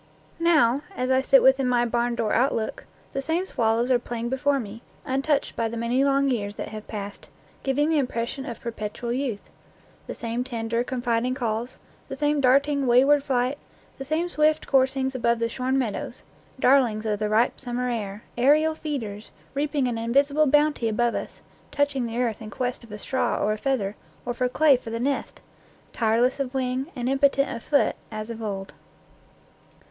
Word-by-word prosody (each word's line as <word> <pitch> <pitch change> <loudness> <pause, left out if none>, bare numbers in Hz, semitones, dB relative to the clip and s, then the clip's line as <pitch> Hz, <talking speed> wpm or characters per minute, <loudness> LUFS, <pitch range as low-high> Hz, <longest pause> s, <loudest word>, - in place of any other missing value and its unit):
Now, 295 -7 +4
as 255 +1 -1
I 260 0 +4
sit 270 0 +5
within 265 0 +4
my 240 -1 +3
barn 240 0 0
door 230 -3 0
outlook, 235 -3 0 0.3
the 270 - -1
same 325 +6 -1
swallows 230 -4 +1
are 250 - +4
playing 235 -1 -4
before 280 +2 +1
me, 225 -1 -7 0.2
untouched 275 +2 0
by 230 - 0
the 230 +1 -5
many 240 +3 +1
long 275 0 +3
years 210 -6 -1
that - - -5
have 215 -1 -8
passed, 205 -2 -7 0.3
giving 290 +3 +1
the 310 - +3
impression 245 0 -2
of 235 - -6
perpetual 235 +1 -4
youth; 250 -5 -3 0.6
the - - -5
same 235 +1 -3
tender, 235 -2 -2
confiding 245 0 -1
calls, 235 -1 -3 0.3
the 270 - -5
same 295 +1 +1
darting, 275 +1 +3
wayward 270 +4 +5
flight, 260 0 0 0.4
the - - -4
same 310 +5 -1
swift 310 -2 +2
coursings 265 0 +2
above 235 -2 +1
the 230 0 0
shorn 255 +3 -1
meadows; 235 -6 -3 0.4
darlings 250 -5 +3
of 210 -2 -1
the 210 0 -1
ripe 225 +3 +2
summer 250 -1 -3
air, 210 -3 -4 0.2
aerial 305 +5 +4
feeders, 230 -10 -5 0.2
reaping 285 -1 0
an 235 -2 -2
invisible 280 +6 +2
bounty 295 -4 +3
above 235 +2 +1
us, - - -6 0.3
touching 285 -4 0
the 230 +1 -5
earth 235 -4 -1
in 215 - -7
quest 250 +3 -3
of 230 - -14
a 210 - -6
straw 260 +5 -1
or 210 - +1
a - - -4
feather, 215 -7 -1 0.3
or 245 - -2
for 250 +1 0
clay 290 +2 +5
for 245 -2 -6
the 230 +1 -3
nest, 275 +3 -2 0.5
tireless 235 +4 +2
of 270 -1 -3
wing, 260 +1 -1
and 245 -2 -3
impotent 275 0 +2
of 230 - -7
foot, 285 +3 +2 0.2
as 215 +1 -5
of 230 0 -7
old. 195 -2 -5
250 Hz, 180 wpm, -25 LUFS, 230-275 Hz, 0.6 s, sit